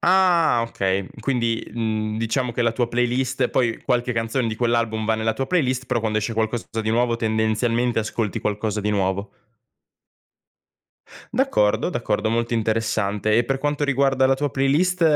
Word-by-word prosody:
Ah 175 -9 +4
okay, 95 -2 -1
quindi, 115 -2 0
uhm, 110 -2 -2
diciamo 120 +2 -1
che 120 - -1
la 115 - +3
tua 120 +1 0
playlist 125 +2 0
poi 120 -3 0
qualche 125 0 0
canzone 115 +2 -1
di 110 - -2
quell'album 115 -2 0
va 110 - +2
nella 110 0 0
tua 135 +2 -3
playlist, 130 -7 0
però, 125 -2 0
quando 110 -1 0
esce 110 +2 -2
qualcosa 110 +1 -1 0.2
di 110 - -1
nuovo, 120 0 +1
tendenzialmente 115 +2 0
ascolti 110 -2 -2
qualcosa 105 0 -2
di 105 +1 -1
nuovo. 100 0 -1 2.0
D'accordo, 105 +1 +2
d'accordo, 110 -2 -1
molto 115 +1 0
interessante, 110 -1 0
e 120 - +3
per 135 +2 -1
quanto 145 +1 -1
riguarda 135 -1 +2
la 135 - +3
tua 145 +1 -2
playlist, 160 +8 +1
115 Hz, 160 wpm, -22 LUFS, 110-130 Hz, 2.0 s, Ah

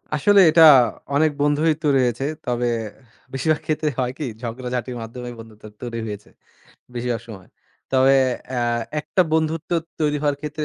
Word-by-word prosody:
আসলে, 200 +7 +4
এটা 165 +1 +6 0.5
অনেক 155 +1 +3
বন্ধুই 145 +2 +2
তো 155 - -1
রয়েছে। 125 0 0 0.2
তবে 120 -1 -1 0.7
বেশিরভাগ 150 +3 0
ক্ষেত্রে 155 0 0
হয় 125 -1 0
কি? 150 - -4 0.2
ঝগড়াঝাঁটির 125 +1 -4
মাধ্যমে 120 +2 -7
বন্ধুত্ব 110 -2 -14 0.2
তৈরি 120 -1 -5
হয়েছে, 105 -1 -8 0.7
বেশিরভাগ 120 -1 -2
সময়। 95 -5 -11 0.4
তবে 135 +1 +5 0.4
অ্যা 125 -2 -2 0.4
একটা 150 +5 -1
বন্ধুত্ব 160 0 -1 0.3
তৈরি 150 -1 +1
হওয়ার 145 -1 +1
ক্ষেত্রে 150 0 -4
130 Hz, 140 wpm, -21 LUFS, 120-155 Hz, 0.7 s, এটা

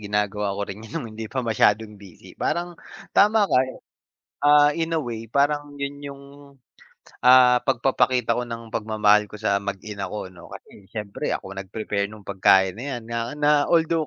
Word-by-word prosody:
gina-gawa 105 -1 -1
ko 100 - -2
rin 100 +1 -8
yun 110 - -11
nung 140 - -4
hindi 110 0 -7
pa 130 +1 -3
masyadong 105 -1 +1
busy 95 -4 -14
parang 175 +3 -2 0.4
tama 210 +1 +5
ka 195 - +2 0.8
ah, 145 0 +6
in 165 0 -2
a 165 - +1
way 115 -6 -6
parang 145 +1 0
yun 140 +1 -5
yung 140 -1 -8 1.0
ah, 125 -1 +7
pag-papakita 125 -2 +1
ko 125 - -3
ng 115 -1 -8
pagmamahal 105 -1 +2
ko 105 - -15
sa 100 -1 0
mag 100 -1 -5
ina 100 -2 -5
ako 105 -3 -6
'no 85 -2 -14
kasi 100 - -14
siyempre 105 -2 -3
ako 95 0 -7
nag-prepare 100 +1 -3
nung 105 +1 -13
pagkain 95 0 +3
na 125 - -6
yan - - -13
na 115 +2 -3
na 150 0 +2 0.2
although 165 -1 +2
115 Hz, 175 wpm, -23 LUFS, 105-140 Hz, 1.0 s, ah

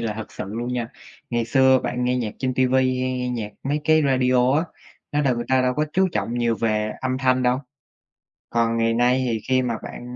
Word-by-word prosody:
là 115 -2 -2
thật 110 -1 -8
sự - - -5
luôn 120 +5 -4
nha, 120 -2 -2 0.4
ngày 120 -1 0
xưa 130 +2 +4
bạn 125 0 -2
nghe 125 0 +1
nhạc 115 -4 -3
trên 130 -1 -1
ti 130 0 +3
vi 130 0 +2
hay 130 0 -1
nghe 125 0 -2
nhạc 110 -4 -4
mấy 145 +2 -1
cái 155 0 +4
radio 130 -1 +3
á, 165 - 0 0.5
nó 150 - +1
đâu 130 -3 +2
người 120 - -3
ta 130 -1 +3
đâu 125 0 +1
có 150 - +1
chú 190 0 +3
trọng 120 - -2
nhiều 120 -1 +1
về 110 -1 0
âm 130 0 -1
thanh 130 -1 +2
đâu. 125 +1 +2 0.9
Còn 115 -1 +1
ngày 115 0 +2
nay 125 +2 +2
thì 115 -2 -1
khi 130 0 +3
mà 120 -2 -1
bạn - - -8
125 Hz, 235 wpm, -23 LUFS, 115-130 Hz, 0.9 s, xưa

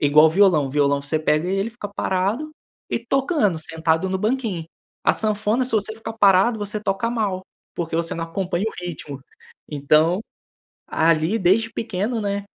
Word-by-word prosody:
Igual 150 +2 +6
violão, 175 -4 +4
o - - -6
violão 140 0 +2
você 140 +3 -1
pega 155 +2 +1
ele, 195 +4 -1
fica 235 -2 -7
parado 200 +9 -1 0.4
e - - 0
tocando, 240 - +1
sentado 160 +2 0
no 190 - -1
banquinho. 215 -5 -1 0.4
A - - +6
sanfona 215 +3 0
se 250 - -2
você 215 0 0
ficar 225 0 -7
parado, 205 +2 +4
você 210 0 -4
toca 195 +2 -1
mal, 205 -6 -1 0.3
porque 165 -2 -4
você 165 0 -1
não 165 - -3
acompanha 180 +2 -2
o - - -9
ritmo. 150 -5 -6 0.5
Então, 155 +5 +3 0.7
ali 165 +5 +2
desde 215 +5 +2
pequeno, 225 +2 -2
né, 200 -1 -2
190 Hz, 160 wpm, -22 LUFS, 160-220 Hz, 0.7 s, Igual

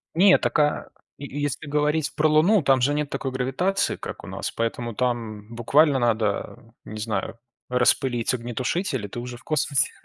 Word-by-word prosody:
Нет, 185 +2 +6
так, - - 0
а, 150 0 +1 0.3
е 140 - -7 0.2
если 145 +1 -3
говорить 150 +1 0
про 155 - +3
Луну, 170 +7 +4
там 135 -2 +3
же 140 +4 +2
нет 150 -1 -1
такой 135 - -3
гравитации, 135 +10 0
как - - -8
у - - -9
нас, - - -4
поэтому 115 0 -3
там 115 -4 -2
буквально 140 +4 +3
надо, 115 -1 -1
не 110 - -7
знаю, 110 +1 -3 0.3
распылить 125 -1 +2
огнетушитель, 125 - -2
и - - -5
ты 110 - -7
уже 120 0 -7
в - - -19
космосе. 145 -4 +1
130 Hz, 175 wpm, -24 LUFS, 120-150 Hz, 0.3 s, Нет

